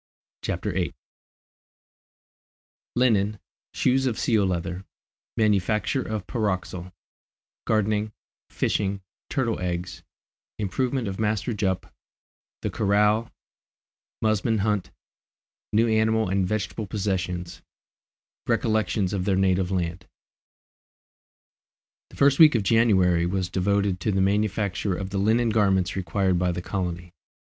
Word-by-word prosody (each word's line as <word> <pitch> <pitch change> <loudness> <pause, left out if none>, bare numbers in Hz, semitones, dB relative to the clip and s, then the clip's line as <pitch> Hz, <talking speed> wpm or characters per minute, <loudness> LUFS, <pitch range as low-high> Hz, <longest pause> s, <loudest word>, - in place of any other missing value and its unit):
CHAPTER - - -2
VIII - - -2 2.0
Linen 110 -4 +2 0.4
Shoes 130 +1 +2
of 115 - -1
Seal 110 -5 +2
leather 90 +1 -3 0.5
Manufacture 105 +4 +1
of 110 -5 -4
Pyroxyle 95 -5 -3 0.7
Gardening 110 0 +1 0.4
Fishing 100 -1 -1 0.3
Turtle 120 -6 -1
eggs 90 -1 -4 0.6
Improvement 120 +4 -1
of 95 +1 -5
Master 110 +2 0
Jup 95 -4 -2 0.7
The - - -1
Corral 105 +2 +2 0.9
Musmon 110 0 +1
Hunt 105 -2 0 0.8
New 115 +2 +3
Animal 110 -1 +2
and 95 -1 +1
Vegetable 110 +1 -3
Possessions 90 -3 -3 0.9
Recollections 110 -3 +1
of 95 -2 -1
their 100 -1 +2
Native 95 -1 +2
Land. 90 -1 -2 2.0
The - - -15
first 140 -1 +4
week 155 -4 +8
of 110 - +2
January 95 -6 +3
was 95 0 -1
devoted 100 0 +1
to 105 - 0
the 95 - 0
manufacture 100 0 0
of 95 +1 -5
the 100 - -1
linen 115 +4 +2
garments 95 -4 +2
required 95 0 0
by 90 0 +1
the 90 +1 -4
colony. 90 -2 -4
100 Hz, 110 wpm, -25 LUFS, 95-110 Hz, 2.0 s, week